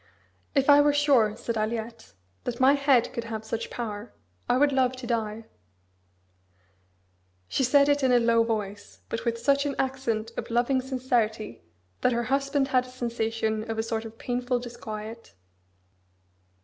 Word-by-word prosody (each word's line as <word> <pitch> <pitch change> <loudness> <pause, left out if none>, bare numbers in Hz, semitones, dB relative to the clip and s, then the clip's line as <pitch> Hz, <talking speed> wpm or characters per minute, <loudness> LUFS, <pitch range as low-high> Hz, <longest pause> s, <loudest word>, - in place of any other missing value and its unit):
"If 275 -1 +3
I 290 0 +8
were 290 0 +4
sure," 265 -8 +3
said 235 - -3
Aliette, 225 +1 -4 0.3
"that 240 -1 -3
my 260 +2 +6
head 275 -4 +3
could 235 - -4
have 220 -1 -5
such 225 +1 -4
power, 215 -2 -5 0.4
I 245 - +4
would 290 +1 +4
love 260 -1 +2
to 255 -1 -8
die." 225 -2 -2 2.0
She 265 - 0
said 280 +3 +5
it 285 0 +3
in 260 -1 +3
a 245 - +6
low 230 -1 +4
voice, 210 -3 -4
but 230 - -4
with 230 -1 0
such 280 +4 +2
an 280 - -3
accent 240 -4 -1
of - - -4
loving 245 +3 +2
sincerity 245 - -1 0.4
that 250 - +3
her 235 0 0
husband 275 +2 0
had 255 -2 +2
a - - -12
sensation 225 -3 -2
of 225 - -2
a 220 - 0
sort 225 -1 -2
of 225 0 -10
painful 245 +1 -1
disquiet. 225 - -8
240 Hz, 160 wpm, -27 LUFS, 225-265 Hz, 2.0 s, I